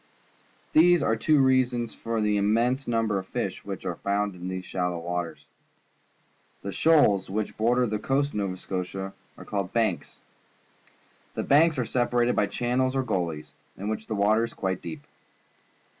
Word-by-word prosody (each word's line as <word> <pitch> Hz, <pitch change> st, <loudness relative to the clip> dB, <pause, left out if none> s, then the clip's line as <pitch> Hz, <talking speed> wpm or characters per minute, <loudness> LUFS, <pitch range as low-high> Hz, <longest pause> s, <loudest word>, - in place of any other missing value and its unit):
These 175 Hz, +2 st, +6 dB
are 115 Hz, -, +2 dB
two 150 Hz, +7 st, +3 dB
reasons 125 Hz, -3 st, +2 dB
for 115 Hz, -1 st, -3 dB
the 105 Hz, -1 st, +2 dB
immense 115 Hz, +6 st, +1 dB
number 115 Hz, -4 st, +1 dB
of 95 Hz, -, -9 dB
fish -, -, -3 dB
which -, -, -6 dB
are -, -, -3 dB
found 100 Hz, 0 st, -1 dB
in 90 Hz, 0 st, -7 dB
these 95 Hz, 0 st, -4 dB
shallow 90 Hz, -1 st, -2 dB
waters. 85 Hz, -3 st, -4 dB, 1.2 s
The 100 Hz, -, -4 dB
shoals 105 Hz, -, +4 dB
which 105 Hz, +2 st, -3 dB
border 120 Hz, +3 st, +2 dB
the 105 Hz, -2 st, -2 dB
coast 140 Hz, +5 st, +1 dB
of -, -, -17 dB
Nova 95 Hz, -2 st, -2 dB
Scotia 95 Hz, +1 st, -4 dB, 0.2 s
are -, -, -11 dB
called 100 Hz, -2 st, -3 dB
banks. 110 Hz, -6 st, -1 dB, 1.2 s
The -, -, -1 dB
banks 150 Hz, +2 st, +4 dB
are 125 Hz, -, 0 dB
separated 120 Hz, 0 st, +1 dB
by 105 Hz, -, +2 dB
channels 125 Hz, +5 st, 0 dB
or 135 Hz, -, +1 dB
gullies, 85 Hz, -9 st, -3 dB, 0.3 s
in 100 Hz, +3 st, -4 dB
which 110 Hz, 0 st, -4 dB
the 110 Hz, -, -2 dB
water 105 Hz, +3 st, +3 dB
is 115 Hz, -, -5 dB
quite 95 Hz, -1 st, -2 dB
deep. 80 Hz, -4 st, -7 dB
110 Hz, 165 wpm, -26 LUFS, 95-125 Hz, 1.2 s, These